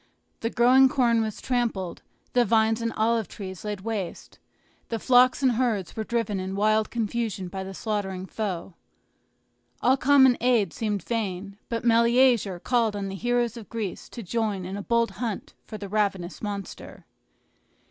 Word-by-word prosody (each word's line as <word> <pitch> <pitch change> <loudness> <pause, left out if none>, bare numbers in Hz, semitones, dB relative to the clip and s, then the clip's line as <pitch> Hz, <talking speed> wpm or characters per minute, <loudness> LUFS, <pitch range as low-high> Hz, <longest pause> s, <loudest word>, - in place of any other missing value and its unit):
The 230 - -1
growing 255 +3 +5
corn 240 -4 +2
was 220 -2 -3
trampled, 230 -8 -2 0.3
the 245 - +4
vines 225 0 +2
and 230 0 -1
olive 225 -1 +1
trees 190 -3 -8
laid 210 -2 -4
waste, 205 -4 -5 0.5
the 230 - -1
flocks 255 +3 +4
and 260 - +5
herds 225 -6 -1
were 220 - -2
driven 220 -3 -1
in 190 +1 -4
wild 215 +1 +2
confusion 220 -4 -2
by 190 +1 -5
the 190 0 -8
slaughtering 190 -4 -3
foe. 190 -3 -4 1.1
All 260 +2 +3
common 265 -2 +5
aid 240 -4 +2
seemed 210 -3 -2
vain; 200 -3 -3
but 230 0 -3
Meleager 235 -4 +4
called 230 0 +1
on 200 -1 -3
the 195 - -5
heroes 240 +2 0
of 225 - -10
Greece 215 -5 -5
to 235 - -8
join 205 -2 -2
in 190 +2 -5
a 205 - -4
bold 235 +2 +1
hunt 225 -5 -4
for 215 - -7
the 205 - -7
ravenous 195 -3 -1
monster. 200 -2 -7
220 Hz, 160 wpm, -26 LUFS, 200-235 Hz, 1.1 s, growing